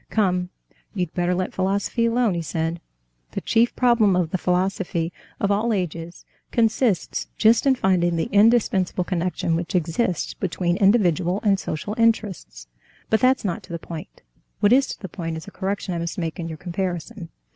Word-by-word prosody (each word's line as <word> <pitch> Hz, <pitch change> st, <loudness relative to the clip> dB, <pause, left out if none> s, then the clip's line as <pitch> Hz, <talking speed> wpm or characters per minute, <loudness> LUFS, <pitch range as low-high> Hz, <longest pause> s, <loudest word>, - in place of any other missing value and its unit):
"Come, 180 Hz, -4 st, +1 dB, 0.5 s
you'd 180 Hz, -4 st, -2 dB
better 180 Hz, 0 st, 0 dB
let 185 Hz, 0 st, -2 dB
philosophy 200 Hz, +5 st, 0 dB
alone," 230 Hz, -3 st, +2 dB
he 170 Hz, -, -2 dB
said. 165 Hz, +1 st, -3 dB, 0.5 s
"The -, -, -3 dB
chief 230 Hz, +1 st, +2 dB
problem 235 Hz, -6 st, +4 dB
of 175 Hz, -3 st, 0 dB
the 185 Hz, -, -1 dB
philosophy 180 Hz, -2 st, -1 dB, 0.3 s
of 200 Hz, -, +1 dB
all 215 Hz, +4 st, +1 dB
ages 170 Hz, -3 st, -4 dB, 0.3 s
consists 225 Hz, -3 st, +1 dB
just 225 Hz, +5 st, +4 dB
in 265 Hz, -, +5 dB
finding 180 Hz, -6 st, +2 dB
the 165 Hz, -, -1 dB
indispensable 205 Hz, -4 st, +3 dB
connection 175 Hz, -2 st, -1 dB
which 170 Hz, +2 st, -3 dB
exists 175 Hz, +2 st, 0 dB
between 175 Hz, -2 st, -1 dB
individual 190 Hz, -3 st, +3 dB
and 200 Hz, -3 st, +3 dB
social 175 Hz, +6 st, -4 dB
interests. 210 Hz, -, 0 dB, 0.5 s
But 220 Hz, -, +4 dB
that's 260 Hz, -2 st, +3 dB
not 190 Hz, +2 st, -2 dB
to 185 Hz, -2 st, -14 dB
the -, -, -1 dB
point; 165 Hz, -1 st, -9 dB, 0.4 s
what 205 Hz, +3 st, +4 dB
is 270 Hz, +1 st, +4 dB
to -, -, -6 dB
the 190 Hz, -, -6 dB
point 165 Hz, -2 st, -5 dB
is 160 Hz, -, -8 dB
a -, -, -9 dB
correction 195 Hz, -1 st, -3 dB
I 170 Hz, -, -2 dB
must 170 Hz, +4 st, -4 dB
make 165 Hz, 0 st, -3 dB
in 165 Hz, -, -3 dB
your 160 Hz, -1 st, -6 dB
comparison. 180 Hz, +2 st, -4 dB
185 Hz, 175 wpm, -23 LUFS, 170-210 Hz, 0.5 s, in